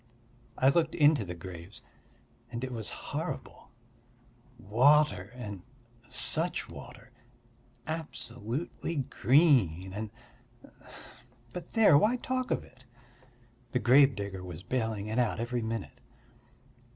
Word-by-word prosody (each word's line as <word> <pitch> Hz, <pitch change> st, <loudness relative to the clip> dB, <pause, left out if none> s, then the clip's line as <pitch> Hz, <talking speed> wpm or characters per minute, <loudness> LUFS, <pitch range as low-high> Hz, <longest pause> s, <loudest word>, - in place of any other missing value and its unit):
I 130 Hz, -, +5 dB
looked 160 Hz, +3 st, +2 dB
into 145 Hz, -4 st, +5 dB
the 90 Hz, -2 st, -6 dB
graves 85 Hz, +2 st, -10 dB, 0.7 s
and 120 Hz, +1 st, -4 dB
it 130 Hz, -, -3 dB
was 115 Hz, -3 st, -4 dB
horrible: -, -, -6 dB, 0.9 s
water 120 Hz, -2 st, +3 dB
and 105 Hz, -6 st, -7 dB, 0.5 s
such -, -, 0 dB
water! -, -, -12 dB, 0.7 s
Absolutely 145 Hz, -1 st, -4 dB
green, 130 Hz, -, +3 dB
and... 105 Hz, +1 st, -4 dB, 1.4 s
but 180 Hz, -, -8 dB
there, 220 Hz, -9 st, +6 dB
why 220 Hz, +8 st, +3 dB
talk 255 Hz, 0 st, -2 dB
of -, -, 0 dB
it! 130 Hz, 0 st, -19 dB, 0.9 s
The -, -, +3 dB
gravedigger 120 Hz, -8 st, +3 dB
was 90 Hz, -1 st, -8 dB
baling 110 Hz, -5 st, -2 dB
it 110 Hz, +3 st, -1 dB
out 120 Hz, -2 st, +1 dB
every 120 Hz, +1 st, -2 dB
minute. 110 Hz, -2 st, -5 dB
120 Hz, 105 wpm, -30 LUFS, 100-145 Hz, 1.4 s, there